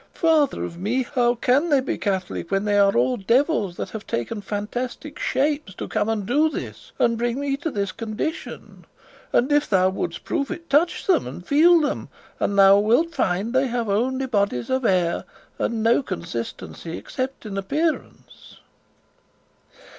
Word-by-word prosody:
"Father 315 -5 +2
of 170 - -8
me! 235 +8 0
how 245 -1 +1
can 265 +7 +2
they 285 -3 +4
be 260 - -2
Catholic 190 -4 -3
when 195 +1 0
they 205 -1 +3
are 200 -6 +4
all 125 +1 +2
devils 230 - +1
that - - -5
have 220 -1 -7
taken 205 - -3
fantastic 240 +8 -5
shapes 285 -8 -1
to - - -5
come 215 0 -1
and 215 -3 -1
do 295 +8 +3
this, - - -7
and 230 -1 +2
bring 240 +2 -1
me 280 -1 -1
to 325 +3 -3
this 200 -7 -2
condition? 230 +8 -6 0.5
And 255 +4 +2
if 290 0 +2
thou 185 -2 +4
wouldst 175 -3 -4
prove 280 -5 -2
it, 335 - -7
touch 310 +5 +2
them, 360 - +2
and 155 +8 -8
feel 335 +4 +6
them, 290 - -2 0.3
and 200 - 0
thou 195 0 +7
wilt 240 +11 +2
find 190 +6 0
they 260 +1 +3
have 235 -3 -2
only 260 +6 0
bodies 200 - -1
of 260 -1 0
air, 180 -4 +2 0.4
and 225 -2 -1
no 230 +4 +4
consistency 115 - -6
except 260 -2 -5
in 205 -2 -5
appearance." 305 - -3
230 Hz, 170 wpm, -23 LUFS, 195-280 Hz, 0.5 s, thou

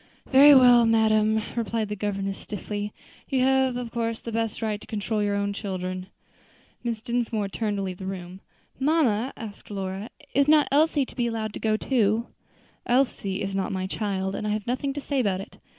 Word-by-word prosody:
"Very 280 +2 +9
well, 245 -3 +7
madam," 220 -1 +3
replied 230 -2 -1
the 210 - -2
governess 195 -1 -3
stiffly, 205 0 -5 0.4
"you 265 -1 +1
have 265 -1 +3
of 245 -2 -5
course 230 -1 -2
the 230 - -7
best 225 -1 -2
right 215 -2 -2
to - - -13
control 215 0 -2
your 205 -1 +1
own 200 0 -1
children." 185 -2 -4 0.8
Mrs. 230 -2 -3
Dinsmore 230 -4 -1
turned 210 0 -2
to 195 - -2
leave 185 -1 -5
the 190 - -5
room. 185 0 -7 0.4
"Mamma," 265 -5 +2
asked 215 -3 -9
Lora, 195 +1 -4 0.2
"is 280 +1 +3
not 300 -1 +5
Elsie 295 -1 +3
to - - -15
be 240 -2 0
allowed 220 -2 -3
to - - -6
go 215 -1 +1
too?" 225 -2 +1 0.6
"Elsie 240 -7 +1
is 195 0 -3
not 195 0 -1
my 190 -1 -2
child, 190 -1 -2
and 210 - -3
I 210 - +1
have 210 -1 -3
nothing 255 +3 -1
to 290 - -5
say 280 -1 -1
about 200 -6 +1
it. 195 - -10
215 Hz, 195 wpm, -26 LUFS, 200-245 Hz, 0.8 s, Very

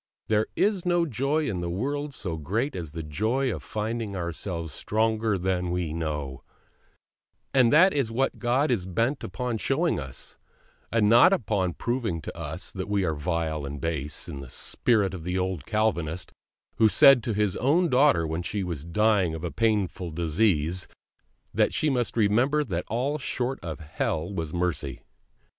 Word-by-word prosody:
There 110 0 +2
is 200 -3 +1
no 175 -1 +2
joy 145 +3 0
in 90 -5 -2
the 85 - -3
world 140 +10 -2
so 90 -5 -3
great 105 - -2
as 80 -5 -6
the 80 -1 -5
joy 110 - 0
of 80 - -6
finding 110 +2 -3
ourselves 85 -2 -4
stronger 110 +1 0
than 90 -1 -1
we 85 -3 -2
know; 75 -4 -3 1.1
and 125 -3 +5
that 185 +6 +6
is 135 -6 0
what 135 +4 0
God 130 +4 +1
is 95 -7 0
bent 115 +10 0
upon 125 -3 -3
showing - - +1
us, - - -8 0.5
and 115 -2 +3
not 120 - +7
upon 100 - 0
proving 120 -8 -2
to - - -7
us 80 +2 -5
that 95 0 -5
we 100 -1 +1
are 80 - 0
vile 80 -1 -2
and 70 +1 -5
base, 75 -3 -2
in 70 - -6
the 70 -2 -9
spirit 105 - +1
of 90 -4 -6
the 90 +2 -2
old 90 -5 -2
Calvinist 90 -6 -1 0.5
who 110 -1 +5
said 135 +3 +7
to 115 0 -2
his 105 -3 +1
own 165 +7 +3
daughter 130 - +4
when 80 +2 -2
she 100 +3 -3
was 85 -5 -4
dying 95 -1 +2
of 80 - -7
a 85 - -3
painful 105 -5 0
disease, 85 +1 +1 0.7
that - - +2
she 155 - +2
must 120 -2 -1
remember 120 +8 +3
that 90 - -3
all 135 +7 -1
short 130 -1 -2
of 85 -2 -6
Hell 80 +3 -2
was 80 -5 -3
mercy. 85 -6 -2
100 Hz, 170 wpm, -26 LUFS, 85-120 Hz, 1.1 s, not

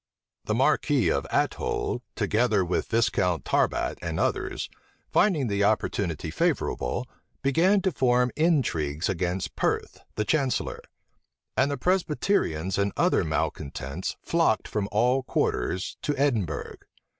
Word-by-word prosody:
The - - 0
marquis - - +2
of - - -1
Athole, - - 0
together 110 -4 +2
with 90 - -1
Viscount 100 -7 +1
Tarbat - - +1
and 85 -2 -3
others, - - -1 0.4
finding 175 -10 +3
the 100 -2 0
opportunity 90 -6 0
favorable, 80 - -1 0.4
began 175 +8 +3
to 190 - +2
form 125 -3 +2
intrigues 90 - +1
against 90 0 -2
Perth, - - -1 0.2
the 105 - -1
chancellor; 135 +2 0 0.7
and 140 - +3
the 140 - -2
Presbyterians 150 - 0
and 100 0 +1
other - - +3
malecontents 70 +5 -3
flocked 165 - +2
from 105 -1 -2
all 125 +5 +3
quarters 95 -6 -1
to 145 - -1
Edinburgh. 115 - -1
110 Hz, 120 wpm, -26 LUFS, 90-140 Hz, 0.7 s, finding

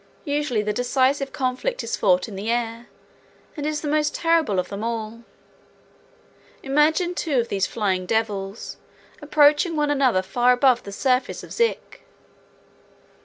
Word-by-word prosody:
Usually 285 -7 -1
the 210 0 -1
decisive 260 +4 +1
conflict 265 - -2
is - - -2
fought 180 -3 +2
in 210 - -9
the 200 +4 -4
air, 235 0 -2 0.7
and 295 -1 -3
is 305 -1 -2
the 300 - -4
most 300 0 0
terrible 330 - +1
of 180 -1 -1
them 200 +2 -5
all. 230 0 -4 1.4
Imagine 310 +6 +2
two 305 -7 0
of 235 - -2
these 195 -1 0
Flying 190 -5 -1
Devils 205 -2 -2 0.4
approaching 300 +3 +3
one 295 -1 +1
another 260 -9 +2
far 245 +5 +2
above 250 -1 +3
the 200 - -9
surface 255 +5 0
of - - -10
Zik. 465 -1 -1
250 Hz, 145 wpm, -23 LUFS, 215-295 Hz, 1.4 s, approaching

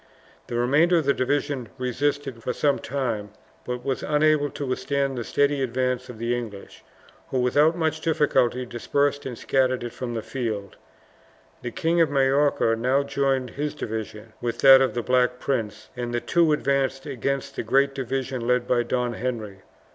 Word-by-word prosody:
The 120 - -5
remainder 145 +9 +3
of 160 - 0
the 140 - +4
division 140 -2 -1
resisted 135 0 -2
for 125 - -2
some 145 -2 +1
time, 115 -6 -3 0.4
but 125 0 -4
was 135 -1 -1
unable 150 -1 +2
to 145 - -5
withstand 135 +1 -1
the 120 - -3
steady 140 +6 +1
advance 125 0 -1
of 125 - -8
the 115 +2 -1
English, 110 -5 -8 0.5
who 130 - 0
without 145 +7 +3
much 160 -1 -1
difficulty 130 -6 +1
dispersed 140 +4 -1
and 125 -3 -6
scattered 130 -1 +1
it 120 -1 -5
from 120 -1 -5
the 110 - -3
field. 110 -7 -4 0.9
The 120 - -4
King 170 +4 +1
of 160 - +4
Majorca 135 -3 +2
now 130 +5 +1
joined 135 -3 0
his 150 +1 -3
division 110 -2 -6
with 120 -1 -2
that 135 -1 +9
of 130 - +1
the 120 - -1
Black 125 0 +2
Prince, 110 -5 -3
and 120 -1 -4
the 120 - 0
two 170 +4 +2
advanced 135 -2 0
against 135 0 -3
the - - -2
great 135 +4 +2
division 130 -2 -3
led 125 0 +2
by 125 -1 +3
Don 120 0 -1
Henry. 110 -5 -4
130 Hz, 170 wpm, -24 LUFS, 120-140 Hz, 0.9 s, that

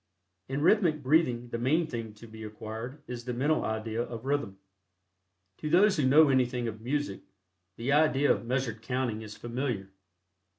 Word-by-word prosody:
In 140 +2 -1
rhythmic 165 -6 +3
breathing 125 -4 +2
the 115 - -3
main 155 +8 +2
thing 115 -7 -6
to 110 - -13
be 110 -1 -11
acquired 110 +6 -7
is 120 -1 -6
the 125 0 -4
mental 145 +5 +1
idea 110 +1 -2
of 120 0 -6
rhythm. 135 -9 -1 1.0
To 150 - -3
those 190 +4 +5
who 140 -4 +2
know 150 +2 +7
anything 125 -2 +1
of 110 -1 -6
music, 135 -3 -2 0.6
the 120 +4 -1
idea 145 -1 +4
of - - 0
measured 125 -3 -1
counting 125 -2 -2
is 105 -1 -9
familiar. 120 -5 -3
125 Hz, 165 wpm, -29 LUFS, 115-145 Hz, 1.0 s, know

